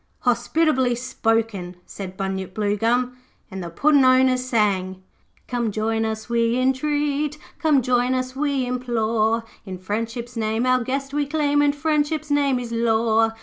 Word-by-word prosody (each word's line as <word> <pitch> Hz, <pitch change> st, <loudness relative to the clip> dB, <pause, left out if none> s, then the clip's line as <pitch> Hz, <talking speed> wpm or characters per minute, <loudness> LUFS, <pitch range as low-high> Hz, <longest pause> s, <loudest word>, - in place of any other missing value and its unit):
'Hospitably 255 Hz, +1 st, +2 dB
spoken,' 225 Hz, -7 st, -1 dB
said 190 Hz, -2 st, -8 dB
Bunyip 190 Hz, -1 st, -4 dB
Bluegum, 230 Hz, +4 st, 0 dB, 0.3 s
and 190 Hz, -1 st, -5 dB
the 170 Hz, -, -5 dB
Puddin' 285 Hz, -, +3 dB
owners 255 Hz, 0 st, +4 dB
sang 195 Hz, -6 st, 0 dB, 0.4 s
'Come 240 Hz, -2 st, -1 dB
join 225 Hz, +1 st, -1 dB
us 220 Hz, 0 st, -4 dB
we 235 Hz, 0 st, +1 dB
intreat, 290 Hz, +3 st, 0 dB, 0.2 s
Come 300 Hz, -5 st, +3 dB
join 250 Hz, +1 st, +2 dB
us 255 Hz, 0 st, -3 dB
we 280 Hz, -2 st, 0 dB
implore, 230 Hz, -2 st, 0 dB, 0.2 s
In 190 Hz, -2 st, -7 dB
Friendship's 230 Hz, +5 st, -4 dB
name 220 Hz, +1 st, -1 dB
our 255 Hz, -1 st, +2 dB
guest 275 Hz, +2 st, -3 dB
we 290 Hz, -1 st, 0 dB
claim, 290 Hz, -1 st, +1 dB
And 290 Hz, 0 st, +2 dB
Friendship's 305 Hz, 0 st, -1 dB
name 280 Hz, -2 st, +2 dB
is 245 Hz, -1 st, -5 dB
law. 225 Hz, -1 st, +2 dB
245 Hz, 145 wpm, -22 LUFS, 220-275 Hz, 0.4 s, owners